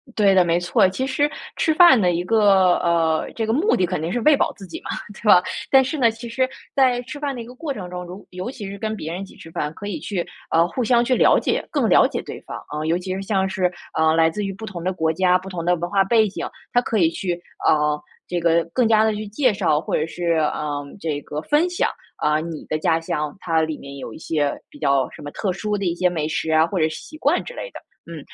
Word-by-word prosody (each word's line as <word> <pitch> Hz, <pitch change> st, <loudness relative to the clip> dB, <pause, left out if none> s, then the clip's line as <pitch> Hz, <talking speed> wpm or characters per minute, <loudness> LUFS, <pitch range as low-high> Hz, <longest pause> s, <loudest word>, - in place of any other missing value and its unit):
对 200 Hz, -2 st, +4 dB
的， 185 Hz, -, +6 dB
没 170 Hz, 0 st, +1 dB
错。 175 Hz, +1 st, +3 dB
其 260 Hz, +8 st, -3 dB
实 285 Hz, +2 st, +1 dB, 0.3 s
吃 315 Hz, -, +2 dB
饭 310 Hz, -7 st, +7 dB
的 180 Hz, -3 st, +3 dB
一 170 Hz, +1 st, -1 dB
个， 195 Hz, -4 st, +4 dB
呃， 165 Hz, -2 st, +1 dB
这 225 Hz, -, -1 dB
个 220 Hz, -, +1 dB
目 345 Hz, -, +2 dB
的 185 Hz, -, +2 dB
肯 180 Hz, -3 st, -3 dB
定 165 Hz, +2 st, -2 dB
是 245 Hz, -, 0 dB
喂 300 Hz, +4 st, +6 dB
饱 -, -, +1 dB
自 195 Hz, -, -10 dB
己 -, -, -7 dB
嘛， -, -, -9 dB, 0.2 s
对 215 Hz, -, -14 dB
吧？ 180 Hz, -3 st, +8 dB, 0.3 s
但 270 Hz, -1 st, +7 dB
是 285 Hz, +4 st, -3 dB
呢， 235 Hz, -5 st, +4 dB
其 230 Hz, +2 st, -9 dB
实 255 Hz, +3 st, 0 dB, 0.3 s
在 255 Hz, -3 st, +3 dB
吃 280 Hz, +4 st, -8 dB
饭 285 Hz, -1 st, -2 dB
的 245 Hz, -, -6 dB
一 -, -, -8 dB
个 245 Hz, +2 st, -12 dB
过 295 Hz, +1 st, -4 dB
程 185 Hz, -7 st, -7 dB
中， 180 Hz, 0 st, -6 dB
如 180 Hz, +3 st, -10 dB
尤 185 Hz, +6 st, -5 dB
其 210 Hz, -7 st, -7 dB
是 200 Hz, -, -7 dB
跟 220 Hz, +1 st, -3 dB
别 160 Hz, -4 st, -5 dB
人 180 Hz, -, -5 dB
一 -, -, -5 dB
起 -, -, -16 dB
吃 165 Hz, -, -12 dB
饭， 150 Hz, -1 st, -3 dB
可 205 Hz, +5 st, -8 dB
以 250 Hz, -, -4 dB
去， 195 Hz, -10 st, -3 dB, 0.3 s
呃， 165 Hz, +1 st, +4 dB
互 210 Hz, +9 st, -2 dB
相 235 Hz, +1 st, +3 dB
去 255 Hz, -, +2 dB
了 -, -, +5 dB
解， -, -, -1 dB
更 -, -, +1 dB
了 -, -, +6 dB
解 -, -, -2 dB
对 -, -, -8 dB
方 -, -, -7 dB
啊。 150 Hz, +1 st, -4 dB
尤 165 Hz, +2 st, +2 dB
其 185 Hz, +1 st, -4 dB
是 195 Hz, -, -4 dB
像 195 Hz, -1 st, 0 dB
是， 185 Hz, -1 st, 0 dB, 0.3 s
呃， 160 Hz, 0 st, +4 dB
来 165 Hz, 0 st, +4 dB
自 210 Hz, +5 st, -4 dB
于 195 Hz, -, -3 dB
不 220 Hz, +3 st, -8 dB
同 180 Hz, -5 st, -7 dB
的 185 Hz, -, 0 dB
国 160 Hz, -3 st, 0 dB
家， 180 Hz, +2 st, +3 dB
不 190 Hz, +1 st, -9 dB
同 175 Hz, -3 st, -5 dB
的 175 Hz, +1 st, +3 dB
文 175 Hz, +1 st, -4 dB
化 195 Hz, 0 st, +3 dB
背 220 Hz, +2 st, +3 dB
景， 200 Hz, -, -5 dB, 0.3 s
它 245 Hz, -, +4 dB
可 230 Hz, -, -1 dB
以 170 Hz, -5 st, +4 dB
去， 175 Hz, 0 st, -3 dB, 0.3 s
呃， 150 Hz, -1 st, +3 dB, 0.3 s
这 175 Hz, -1 st, -2 dB
个 170 Hz, 0 st, +3 dB
更 250 Hz, -, +3 dB
加 220 Hz, -1 st, +4 dB
地 220 Hz, -1 st, +1 dB
去 215 Hz, +1 st, -5 dB
介 235 Hz, +3 st, +1 dB
绍， 170 Hz, -7 st, +1 dB
或 -, -, -2 dB
者 155 Hz, -, +1 dB
是， 170 Hz, +1 st, -1 dB
呃， 150 Hz, -2 st, -1 dB, 0.2 s
这 150 Hz, -4 st, -3 dB
个 150 Hz, +1 st, -5 dB
分 305 Hz, +4 st, +2 dB
享， 355 Hz, -, 0 dB, 0.3 s
啊， 150 Hz, +1 st, +1 dB
你 165 Hz, -1 st, -6 dB
的 155 Hz, -, -1 dB
家 160 Hz, +1 st, +1 dB
乡， 150 Hz, -2 st, -3 dB
它 165 Hz, -3 st, +1 dB
里 155 Hz, -1 st, -2 dB
面 140 Hz, 0 st, -10 dB
有 130 Hz, -4 st, -7 dB
一 -, -, -10 dB
些 150 Hz, -3 st, -1 dB, 0.2 s
比 -, -, -15 dB
较 140 Hz, -3 st, +2 dB
什 -, -, -12 dB
么 145 Hz, -, -7 dB
特 190 Hz, +2 st, -2 dB
殊 210 Hz, +2 st, -2 dB
的 200 Hz, -, -3 dB
一 170 Hz, -1 st, 0 dB
些 180 Hz, +1 st, +2 dB
美 160 Hz, -4 st, -2 dB
食 160 Hz, 0 st, -2 dB
啊， 160 Hz, +1 st, +4 dB
或 190 Hz, -, -3 dB
者 160 Hz, -2 st, +2 dB
是 155 Hz, -, -6 dB
习 310 Hz, -, -11 dB
惯 -, -, +2 dB
之 -, -, -9 dB
类 -, -, -7 dB
的。 -, -, -9 dB, 0.3 s
嗯。 170 Hz, -1 st, -8 dB
185 Hz, 295 characters per minute, -22 LUFS, 165-220 Hz, 0.3 s, 吧